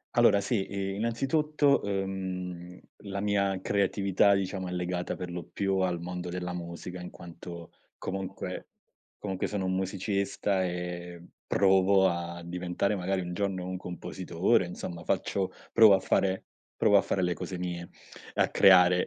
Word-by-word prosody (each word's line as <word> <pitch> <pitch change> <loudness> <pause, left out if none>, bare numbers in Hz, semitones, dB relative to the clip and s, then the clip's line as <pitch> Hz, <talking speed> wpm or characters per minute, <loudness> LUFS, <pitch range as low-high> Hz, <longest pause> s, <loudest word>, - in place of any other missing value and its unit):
Allora 100 - +5
sì, 100 -1 -1
i 95 -1 -2
innanzitutto, 140 +6 +2
uhm, 95 -3 -4 0.3
la 100 0 -3
mia 100 -2 +1
creatività 100 0 +3
diciamo, 95 -1 -2
è 90 - -5
legata 90 0 -2
per 90 -1 -6
lo 85 0 -4
più 95 -1 0
al 90 -2 +1
mondo 90 0 -5
della 90 0 -4
musica 90 +1 -6
in 90 - -7
quanto 85 0 -10 0.3
comunque 95 0 -5 0.5
comunque 95 -2 -3
sono 100 -2 -2
un 95 - 0
musicista 95 +1 0
e 90 -1 -4 0.3
provo 95 0 +4
a 85 0 -3
diventare 90 +3 -1
magari 95 0 -1
un 90 0 -5
giorno 95 -1 -2
un 95 0 -3
compositore, 90 +2 0
insomma 85 -1 -6
faccio 95 +2 -1 0.2
provo 110 -3 +8
a - - +1
fare 95 0 +1 0.3
provo 100 - +5
a - - +5
fare 95 - -1
le 90 0 +1
cose 90 +1 -5
mie, 90 -1 -4 0.5
e - - +2
a - - +3
creare 90 -1 +6
95 Hz, 150 wpm, -29 LUFS, 90-100 Hz, 0.5 s, provo